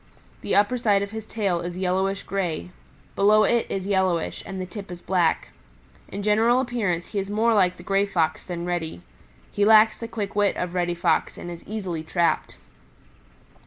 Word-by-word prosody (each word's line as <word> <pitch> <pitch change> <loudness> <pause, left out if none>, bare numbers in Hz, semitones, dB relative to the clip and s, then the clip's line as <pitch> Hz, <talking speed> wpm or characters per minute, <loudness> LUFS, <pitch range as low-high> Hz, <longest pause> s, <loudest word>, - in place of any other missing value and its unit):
The - - -1
upper 210 +5 +3
side 205 -4 +3
of 200 - -6
his 220 -1 -7
tail 195 -7 -1
is 175 +1 -5
yellowish 190 +1 0
gray, 180 -3 -3 0.4
below 210 +2 +5
it 235 +2 +2
is 190 -1 -3
yellowish, 190 -4 0
and 190 - -5
the 185 - -3
tip 195 +2 -9
is 175 -1 -7
black. 175 -2 +1 0.6
In 200 +1 -6
general 225 +4 +3
appearance 215 -9 -1
he 205 - -2
is 195 0 -4
more 225 +3 +2
like 185 -3 +3
the 175 - -12
Gray 195 +2 +1
Fox 165 -5 0
than 175 -1 -5
Reddy. 160 - -3 0.5
He 205 - 0
lacks 215 +1 +6
the 230 - -5
quick 210 -3 -5
wit 205 -1 +2
of 180 -1 -3
Reddy 175 -1 0
Fox 170 -2 0
and 175 - -7
is 170 - -9
easily 190 -6 -4
trapped. 170 +2 0
195 Hz, 185 wpm, -24 LUFS, 175-210 Hz, 0.6 s, lacks